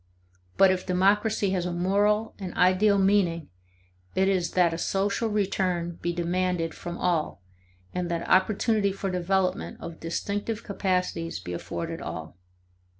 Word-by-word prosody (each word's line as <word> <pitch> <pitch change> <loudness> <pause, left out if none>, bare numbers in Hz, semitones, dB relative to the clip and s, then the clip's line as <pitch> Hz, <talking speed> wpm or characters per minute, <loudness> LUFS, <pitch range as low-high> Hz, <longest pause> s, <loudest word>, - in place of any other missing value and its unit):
But 195 -1 +7
if 185 -1 -1
democracy 200 +2 +2
has 180 -2 0
a - - -2
moral 205 +5 +1
and 185 -3 -6
ideal 185 +3 +4
meaning, 190 - +2 0.7
it 190 0 +3
is 185 -3 0
that 175 -2 +3
a 165 - -4
social 200 +5 0
return 185 -4 -1
be 175 - 0
demanded 175 -1 -1
from 175 0 -6
all 165 - -1 0.5
and 180 -1 -2
that 170 -1 -2
opportunity 200 +2 +3
for 195 0 -3
development 185 +1 0
of 170 -1 -8
distinctive 205 +6 -3
capacities 180 - -1
be 90 0 -6
afforded 165 - -5
all. 80 0 -6
185 Hz, 140 wpm, -27 LUFS, 170-200 Hz, 0.7 s, But